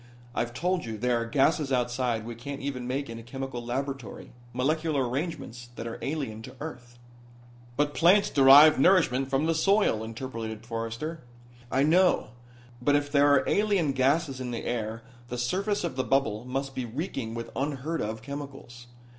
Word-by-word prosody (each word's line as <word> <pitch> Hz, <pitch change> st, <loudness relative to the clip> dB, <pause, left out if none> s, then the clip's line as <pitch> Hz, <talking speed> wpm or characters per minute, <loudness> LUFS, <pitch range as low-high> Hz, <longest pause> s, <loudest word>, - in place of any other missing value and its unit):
I've 120 Hz, 0 st, -2 dB
told 180 Hz, +6 st, 0 dB
you 115 Hz, -2 st, -5 dB
there 120 Hz, +1 st, +1 dB
are 115 Hz, -, -3 dB
gases 140 Hz, +3 st, +2 dB
outside 120 Hz, -2 st, 0 dB
we 120 Hz, -, -5 dB
can't 135 Hz, +4 st, -7 dB
even 130 Hz, -3 st, -4 dB
make 140 Hz, +2 st, -2 dB
in 115 Hz, 0 st, -7 dB
a -, -, -9 dB
chemical 130 Hz, +1 st, -6 dB
laboratory, 130 Hz, -1 st, -5 dB, 0.2 s
molecular 145 Hz, +2 st, 0 dB
arrangements 125 Hz, -3 st, -4 dB
that 115 Hz, -, -6 dB
are 115 Hz, -, -6 dB
alien 135 Hz, -8 st, -3 dB
to 130 Hz, +3 st, -10 dB
earth." 125 Hz, -6 st, -8 dB, 0.8 s
"But 145 Hz, 0 st, +1 dB
plants 185 Hz, +5 st, +4 dB
derive 140 Hz, +2 st, +8 dB
nourishment 135 Hz, -6 st, +4 dB
from 135 Hz, +3 st, +1 dB
the 165 Hz, -, +2 dB
soil," 195 Hz, -, +2 dB
interpolated 115 Hz, -1 st, -6 dB
Forrester. 115 Hz, +8 st, -4 dB, 0.5 s
"I 135 Hz, +1 st, +3 dB
know. 175 Hz, -4 st, +3 dB, 0.5 s
But 145 Hz, +3 st, +3 dB
if 145 Hz, 0 st, 0 dB
there 145 Hz, 0 st, +5 dB
are 140 Hz, -, +4 dB
alien 200 Hz, -8 st, +2 dB
gases 135 Hz, +1 st, +1 dB
in 125 Hz, -, -4 dB
the 120 Hz, -1 st, -4 dB
air 115 Hz, -1 st, -3 dB, 0.2 s
the 125 Hz, -, -5 dB
surface 195 Hz, -, -1 dB
of 170 Hz, -6 st, -3 dB
the 130 Hz, -, 0 dB
bubble 120 Hz, -5 st, 0 dB
must 135 Hz, +2 st, -3 dB
be 130 Hz, -, -3 dB
reeking 120 Hz, -2 st, -4 dB
with 115 Hz, 0 st, -6 dB
unheard 145 Hz, +3 st, -2 dB
of 110 Hz, +1 st, -4 dB
chemicals. 135 Hz, -3 st, -8 dB
135 Hz, 170 wpm, -28 LUFS, 120-145 Hz, 0.8 s, derive